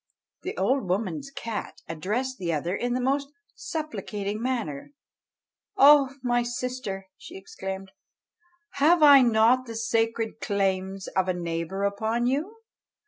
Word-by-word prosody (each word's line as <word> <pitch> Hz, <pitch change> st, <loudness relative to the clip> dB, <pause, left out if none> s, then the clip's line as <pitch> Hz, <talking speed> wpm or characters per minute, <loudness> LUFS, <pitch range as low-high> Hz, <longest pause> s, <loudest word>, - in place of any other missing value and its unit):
The 385 Hz, +5 st, -5 dB
old 260 Hz, -7 st, +1 dB
woman's 190 Hz, -, -2 dB
cat 230 Hz, -5 st, -6 dB
addressed 215 Hz, +11 st, -3 dB
the 175 Hz, -3 st, -1 dB
other 165 Hz, +4 st, -1 dB
in 245 Hz, +2 st, -1 dB
the -, -, 0 dB
most 275 Hz, +2 st, 0 dB, 0.2 s
supplicating 215 Hz, -10 st, -4 dB
manner: 235 Hz, -, -3 dB, 0.8 s
"O 275 Hz, -1 st, +7 dB
my 240 Hz, -1 st, +2 dB
sister!" 240 Hz, -5 st, -4 dB
she -, -, -10 dB
exclaimed, 190 Hz, 0 st, -7 dB, 0.9 s
"have 315 Hz, +3 st, +5 dB
I 285 Hz, -2 st, +9 dB
not 240 Hz, +2 st, +4 dB
the 230 Hz, -, -7 dB
sacred 225 Hz, 0 st, -1 dB
claims 195 Hz, -1 st, -1 dB
of 190 Hz, -1 st, 0 dB
a 185 Hz, -, 0 dB
neighbour 170 Hz, +2 st, -3 dB
upon 220 Hz, +4 st, 0 dB
you? 320 Hz, -, -2 dB
230 Hz, 130 wpm, -26 LUFS, 195-260 Hz, 0.9 s, I